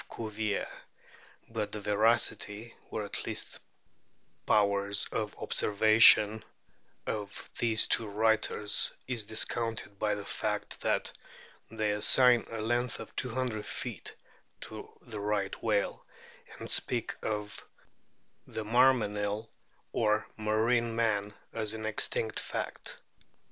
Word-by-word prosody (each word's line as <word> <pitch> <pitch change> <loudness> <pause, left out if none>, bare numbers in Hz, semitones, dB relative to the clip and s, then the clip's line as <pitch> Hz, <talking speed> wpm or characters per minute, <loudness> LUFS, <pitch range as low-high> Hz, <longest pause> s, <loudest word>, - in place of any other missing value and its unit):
Cuvier), 110 -2 -2 0.8
but 110 -2 -3
the 105 - -5
veracity, 110 +1 +1 0.2
or 105 - -3
at 100 - -3
least - - -3 0.9
powers 100 0 +2
of 110 -2 -3
observation, 110 0 +5 0.6
of 105 -2 -5
these 110 -2 +3
two 115 - +3
writers* 105 0 +2
is 120 -5 -3
discounted 110 -1 -2
by 105 -1 +1
the 100 -1 -7
fact - - -3
that - - 0 0.6
they 110 -2 -1
assign 120 +3 +5
a 115 -1 -4
length 120 +1 -1
of 115 - -10
200 125 -4 -1
feet - - -6 0.5
to - - -8
the 110 -2 -7
Right 100 -1 -2
whale, 105 -3 0 0.5
and - - -7
speak - - 0
of 105 -1 -4 0.8
the 110 - -5
Marmenill 110 -3 +2 0.4
or 105 -1 +2
marine 115 +2 +1
man 105 -3 +1 0.2
as 110 -1 -2
an 110 0 -5
existing 110 +1 0
fact. - - -4
110 Hz, 110 wpm, -31 LUFS, 105-115 Hz, 0.9 s, observation